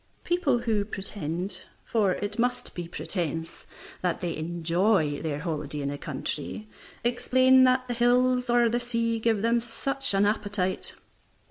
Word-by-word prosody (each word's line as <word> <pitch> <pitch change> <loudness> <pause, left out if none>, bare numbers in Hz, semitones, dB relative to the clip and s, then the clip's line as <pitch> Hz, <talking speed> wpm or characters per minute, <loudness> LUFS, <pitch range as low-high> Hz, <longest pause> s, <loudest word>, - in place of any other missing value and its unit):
People 350 -7 +2
who 220 -4 +1
pretend 185 -2 -4 0.2
(for 205 -5 +2
it 205 +3 -4
must 250 +1 0
be 175 -1 -5
pretence) 165 -2 -4 0.3
that 180 -2 0
they 175 -2 -2
enjoy 170 0 +1
their 155 -3 -2
holiday 150 -3 -3
in 140 - -2
the 145 - -4
country, 185 +8 -4 0.4
explain 255 +2 +5
that 255 0 +2
the 245 - -2
hills 250 +1 +3
or 240 0 +5
the 235 +1 +1
sea 230 -1 -1
gave 220 -2 +1
them 235 +1 +3
such 270 +1 -1
an 195 +1 +4
appetite. 205 -3 -1
210 Hz, 145 wpm, -27 LUFS, 175-240 Hz, 0.4 s, explain